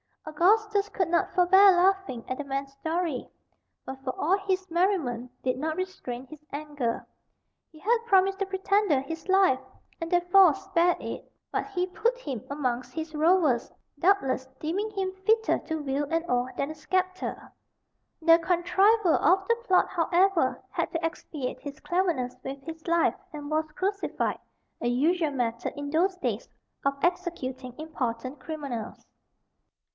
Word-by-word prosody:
Augustus 405 +6 +2
could 370 -5 -1
not 340 - +1
forbear 380 +2 +7
laughing 360 -9 +2
at 255 - -3
the 290 - -4
man's 275 0 -3
story; 320 -1 -2 0.6
but, 265 0 -7
for 255 - -3
all 365 +6 +3
his 375 0 0
merriment, 330 - 0
did 255 -1 0
not 310 +2 -1
restrain 270 -9 -5
his 300 +2 -13
anger. 285 -5 -3 0.7
He 315 - -16
had 460 +7 +2
promised 385 -1 +4
the 395 - +1
pretender 385 -5 +2
his 325 +6 -7
life, 380 -9 +4 0.4
and, 330 -1 -4
therefore, 355 0 +5
spared 370 -3 +1
it; - - -7 0.2
but - - -1
he 365 -3 -1
put 445 +7 0
him 270 - -5
amongst 250 -3 -2
his 320 +1 -5
rowers, 310 -6 +3 0.3
doubtless 285 -8 +2
deeming 380 +8 -2
him 385 -2 -2
fitter 445 0 +3
to 320 -1 -4
wield 285 +1 -2
an 330 0 +1
oar 245 +1 +1
than 280 +2 -1
a - - -8
sceptre. 370 +4 -2 0.7
The 330 0 +7
contriver 370 +3 +3
of 380 +1 +3
the 465 - +4
plot, 370 -1 +4
however, 350 -4 +2
had - - -2
to 330 0 -1
expiate 300 -5 -4
his 285 +1 -8
cleverness 340 -10 0
with 270 +1 -5
his 325 +1 -9
life, 335 0 +3 0.2
and 295 0 -7
was 310 0 0
crucified, 395 +1 -1 0.4
a - - -1
usual 310 +6 +2
method, 235 -3 -2
in 285 0 -5
those 365 +5 +2
days, - - -2 0.4
of 275 0 +1
executing 265 -9 -2
important 260 -3 -4
criminals. 270 -7 -6
330 Hz, 150 wpm, -27 LUFS, 275-375 Hz, 0.7 s, forbear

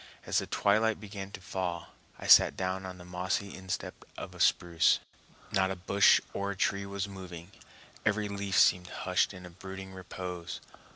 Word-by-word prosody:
As - - +2
the - - -5
twilight 110 +2 +2
began 100 -2 -7
to 100 - -9
fall, 90 -2 -4 0.3
I - - -9
sat - - +7
down 95 0 -2
on 90 -1 -8
the 90 - -12
mossy 90 +3 -2
instep 95 -1 -5
of - - -7
a - - -13
spruce. 85 -3 +4 0.5
Not 95 0 +2
a 95 - -2
bush 100 +3 +5
or 100 0 -2
tree 100 +1 0
was 100 0 -3
moving; 90 -2 -9 0.5
every 105 -1 +1
leaf 100 -1 -2
seemed 90 -1 +5
hushed - - 0
in 90 0 -10
brooding 95 0 -8
repose. 90 -2 -6
95 Hz, 165 wpm, -30 LUFS, 90-100 Hz, 0.5 s, sat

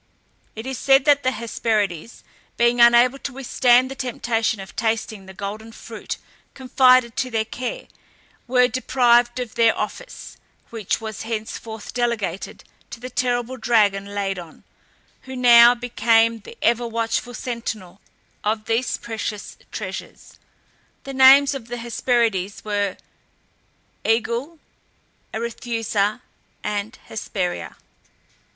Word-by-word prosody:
It 220 +2 -7
is 265 -1 -4
said 270 0 +4
that 290 -1 +5
the 255 - +1
Hesperides, 220 -5 -2 0.3
being 235 0 +3
unable 240 +3 +6
to 275 - -6
withstand 255 -1 +3
the - - -3
temptation 235 -4 -1
of 195 - -10
tasting 220 -3 -2
the 190 - -10
golden 210 +3 -6
fruit - - -7 0.4
confided 255 -2 +4
to 255 - -1
their 225 -2 -1
care, 255 - -5 0.6
were 250 0 +4
deprived 245 -1 +2
of 245 -3 -5
their 230 -2 +3
office, - - -6 0.3
which 225 -1 -2
was 220 -2 -6
henceforth 220 0 -6
delegated 235 -7 -2 0.3
to - - -9
the 255 +1 -8
terrible 245 0 -1
dragon 205 -5 +2
Ladon, 195 -5 -4 0.6
who 260 0 -7
now 240 -1 +7
became 230 -1 +2
the 200 - -13
ever 235 +1 +2
watchful 230 +1 -2
sentinel 215 -6 -6 0.4
of 215 0 -1
these 230 +2 0
precious 220 -2 -5 0.2
treasures. - - -8 0.6
The 275 - -7
names 270 +2 +7
of 260 -5 -7
the 245 +1 -5
Hesperides 230 -5 -1
were 205 -2 -1 1.1
Aegle, 235 +8 0 0.7
Arethusa, 225 -2 -2 0.4
and 205 +1 -3
Hesperia. 190 -4 -4
235 Hz, 120 wpm, -22 LUFS, 215-250 Hz, 1.1 s, now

